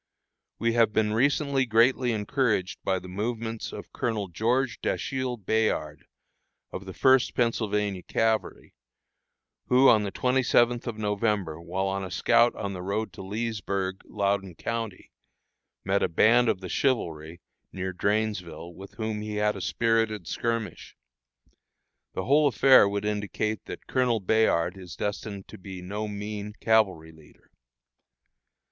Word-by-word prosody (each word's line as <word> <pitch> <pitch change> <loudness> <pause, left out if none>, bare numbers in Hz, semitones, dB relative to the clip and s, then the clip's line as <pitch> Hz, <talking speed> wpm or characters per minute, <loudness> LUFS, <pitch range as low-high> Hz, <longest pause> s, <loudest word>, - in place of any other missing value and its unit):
We 115 0 +1
have 115 -2 +3
recently 135 +6 +2
been - - -19
greatly 120 +3 +3
encouraged 105 -2 0
by 95 -1 +1
the 90 - -8
movements 110 +4 -4
of - - -9
Colonel 105 -5 -2
George 120 +8 0
Dashiel 130 -2 -2
Bayard, 105 -8 -1 0.6
of 95 - -7
the 95 - -7
First 130 -1 +4
Pennsylvania 105 -5 0
Cavalry, 110 +3 -1 0.9
who, 130 +2 +6
on 110 - +5
the 100 -1 -3
27th 125 -1 +2
of 115 -2 -4
November, 105 -6 -1
while 95 +3 -2
on 95 0 -2
a 95 - -5
scout 120 +5 +3
on 100 -1 -4
the 90 - -6
road 100 +4 -2
to - - -9
Leesburg, 100 -2 -3
Loudon 100 -3 -1
county, 115 -2 -5 0.7
met - - +1
a - - +1
band 115 +8 +4
of 95 - 0
the 95 - -6
Chivalry 85 - -1 0.3
near 95 0 -4
Drainesville, 100 -3 -2
with 95 +3 -12
whom 110 -2 -3
he 105 0 -5
had 105 0 +1
a - - -6
spirited 115 -4 0
skirmish. 115 +3 -3 1.2
The 95 - -3
whole 145 +2 +4
affair 130 -5 +6
would 100 +1 -3
indicate 105 0 -2
that - - -8
Colonel 125 -3 +1
Bayard 95 -4 +2
is 90 -2 -9
destined 100 -1 -4
to - - -11
be 95 -1 -8
no 105 +4 -4
mean 105 0 -5
cavalry 95 -8 +2
leader. 80 -2 -21
105 Hz, 140 wpm, -27 LUFS, 95-115 Hz, 1.2 s, who